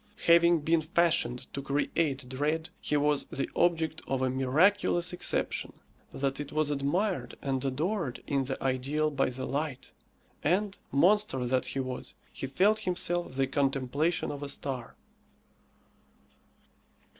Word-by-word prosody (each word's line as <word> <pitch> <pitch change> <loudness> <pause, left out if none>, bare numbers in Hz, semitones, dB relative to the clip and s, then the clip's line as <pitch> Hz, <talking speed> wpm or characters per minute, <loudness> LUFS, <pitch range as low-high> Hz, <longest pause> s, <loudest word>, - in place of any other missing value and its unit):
Having 170 -1 +6
been 160 +2 +2
fashioned 160 -6 +1
to 140 - -3
create 140 0 0
dread, 150 +5 -1
he 150 - 0
was 145 0 +2
the 135 - -3
object 160 -2 +1
of 130 -1 0
a 130 - +1
miraculous 170 +7 +2
exception, 180 - -1 0.4
that 135 0 -2
it 145 -1 -5
was 155 -1 +1
admired 145 - -1
and 135 -1 -2
adored 150 - -2
in 140 -2 0
the 135 0 -3
ideal 135 +4 0
by 135 -2 +1
the 130 +1 -5
light; 145 -2 -3 0.5
and, 195 +5 +1
monster 170 -3 +3
that 130 +1 +1
he 135 - -3
was, 130 -1 -5 0.2
he 135 - -4
felt 200 +10 +3
himself 175 -5 -1
the 135 0 +1
contemplation 140 +4 0
of 145 -1 -6
a 145 - -3
star. 130 -5 -3
145 Hz, 135 wpm, -29 LUFS, 135-170 Hz, 0.5 s, Having